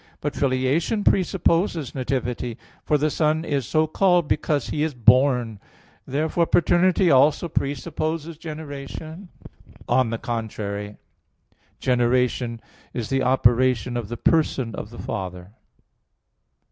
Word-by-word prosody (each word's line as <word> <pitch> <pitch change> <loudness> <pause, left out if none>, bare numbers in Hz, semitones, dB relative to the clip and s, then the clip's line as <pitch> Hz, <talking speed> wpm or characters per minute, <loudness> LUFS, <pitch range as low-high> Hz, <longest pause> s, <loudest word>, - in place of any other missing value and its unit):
But 145 -1 -3
filiation 140 - 0
presupposes 175 -5 +1
nativity; 125 -3 -3 0.3
for 150 - +2
the 150 +1 0
Son 155 +1 +1
is 140 -7 -1
so 155 0 +2
called 175 0 +2
because 145 -3 0
He 150 - -2
is 155 -3 -1
born. 125 -2 +3 0.5
Therefore 160 +4 0
paternity 175 +1 +3
also 145 +5 +4
presupposes 155 +2 -3
generation. 155 +3 -8 0.6
On 130 -3 +2
the 115 - -2
contrary, 105 -3 -5 0.8
Generation 125 -1 +1 0.4
is 115 -3 -3
the 135 0 +1
operation 125 -1 +2
of 120 -3 -3
the 120 - -5
person 135 -7 +1
of 105 - -6
the 120 - -12
Father. 90 -3 -6
135 Hz, 115 wpm, -23 LUFS, 120-160 Hz, 0.8 s, also